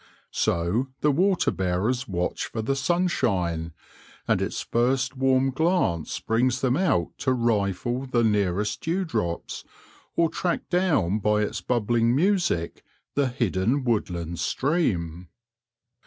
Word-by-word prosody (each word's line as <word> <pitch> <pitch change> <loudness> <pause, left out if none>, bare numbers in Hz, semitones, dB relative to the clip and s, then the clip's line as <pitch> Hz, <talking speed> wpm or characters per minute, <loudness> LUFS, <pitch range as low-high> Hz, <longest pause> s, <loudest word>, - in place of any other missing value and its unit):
So 90 +10 0
the 150 - +4
water 185 +5 +2
bearers 100 +8 -1
watch 90 -2 -2
for 110 - -4
the 135 +5 0
sunshine, 100 - 0 0.6
and - - +2
its - - -2
first 130 +3 0
warm 135 0 +2
glance 160 - 0
brings 120 +3 +1
them 130 -1 +2
out 140 - +1
to 130 - +1
rifle 120 +2 0
the 120 -2 +1
nearest 105 -1 0
dewdrops, 165 - -2 0.5
or 170 - +3
track 175 +2 -2
down 155 - +2
by 105 +1 +2
its - - -3
bubbling 120 0 +1
music 175 - 0 0.3
the 140 -2 +2
hidden 120 +1 0
woodland 85 -8 -2
stream. 90 - -1
120 Hz, 120 wpm, -25 LUFS, 95-140 Hz, 0.6 s, the